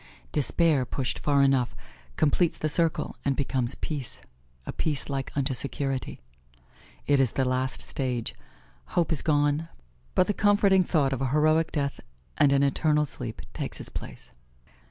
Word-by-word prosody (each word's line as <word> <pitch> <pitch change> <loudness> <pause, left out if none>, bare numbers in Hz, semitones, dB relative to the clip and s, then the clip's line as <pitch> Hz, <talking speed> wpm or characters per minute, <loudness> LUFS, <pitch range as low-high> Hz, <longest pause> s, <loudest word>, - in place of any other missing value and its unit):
Despair 150 -1 +4
pushed 130 +1 -3
far 140 -1 +3
enough 135 -3 +2 0.4
completes 160 +3 +2
the 155 - -1
circle 165 +1 +1
and 140 -1 +1
becomes 130 -2 0
peace 145 -6 -5 0.5
a - - -5
peace 150 -3 -1
like 135 -1 -3
unto 135 -1 0
security. 135 +1 -2 0.9
It 145 -1 +3
is 130 -4 +2
the 135 - +1
last 130 +1 -1
stage: 125 -4 -3 0.6
hope 170 -2 +2
is 155 - +1
gone, 145 0 +1 0.5
but 185 - +4
the 205 - 0
comforting 200 -2 +4
thought 145 -6 +1
of 135 - -2
heroic 155 +4 +2
death 140 -2 -2 0.4
and 140 - +4
an 140 0 +3
eternal 150 +2 +2
sleep 120 -5 -7
takes - - -5
its - - -6
place. - - -9
140 Hz, 150 wpm, -27 LUFS, 135-155 Hz, 0.9 s, Despair